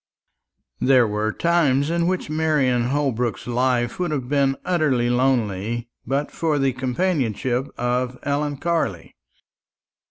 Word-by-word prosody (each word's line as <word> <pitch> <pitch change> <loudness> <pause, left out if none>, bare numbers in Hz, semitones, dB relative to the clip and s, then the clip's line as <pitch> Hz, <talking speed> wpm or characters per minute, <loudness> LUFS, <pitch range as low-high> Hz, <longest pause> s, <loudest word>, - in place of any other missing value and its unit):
There 130 -2 +5
were 105 +1 -1
times 155 -3 +2
in 170 0 +1
which 185 0 -1
Marian 150 -6 +1
Holbrook's 125 -4 -1
life 125 +1 0
would 180 -1 0
have 140 -5 -3
been 140 -1 +2
utterly 140 -9 +1
lonely 120 -3 0 0.2
but 140 +3 -1
for 160 -3 0
the 135 -2 +1
companionship 130 - -1
of 125 +1 -1
Ellen 145 0 -1
Carley. 150 - -2
130 Hz, 120 wpm, -22 LUFS, 120-150 Hz, 0.2 s, There